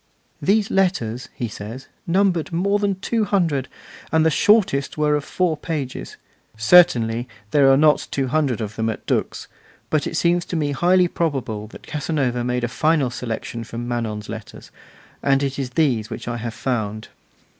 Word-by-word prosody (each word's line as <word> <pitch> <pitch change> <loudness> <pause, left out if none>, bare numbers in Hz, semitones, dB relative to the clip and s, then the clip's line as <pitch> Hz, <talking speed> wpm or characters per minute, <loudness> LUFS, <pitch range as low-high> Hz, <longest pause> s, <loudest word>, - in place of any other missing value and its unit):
'These 205 +1 +2
letters,' 130 - 0
he 120 - -3
says, 110 +5 -8 0.2
'numbered 180 -2 +1
more 200 +5 +1
than 200 -2 -1
two 225 +2 0
hundred, 165 -10 +1 0.4
and 160 0 +3
the 160 - +4
shortest 185 -8 +3
were 150 -1 +2
of 150 -1 0
four 175 +1 0
pages: 145 -4 -5 0.4
Certainly 115 -3 +5 0.2
there 140 -2 +5
are 135 - +5
not 150 +1 +4
two 135 - -1
hundred 135 -5 0
of 110 0 -5
them 110 0 0
at 110 - -5
Dux, - - -2 0.4
but 155 -2 +1
it 165 - -3
seems 175 +1 +2
to - - -5
me 150 -3 0
highly 180 +5 +3
probable 135 -11 -2
that - - -13
Casanova 140 -5 -1
made 125 0 -1
a - - +1
final 150 0 +1
selection 115 -1 -5
from 120 +1 -6
Manon's 110 -3 -3
letters, 110 -1 -9 0.5
and 135 -1 +2
that - - +1
it 140 0 -3
is 135 -2 -2
these 125 -8 +1
which - - -7
I 120 0 -2
have 115 -1 -5
found. 110 -4 -3
140 Hz, 175 wpm, -22 LUFS, 120-165 Hz, 0.5 s, Certainly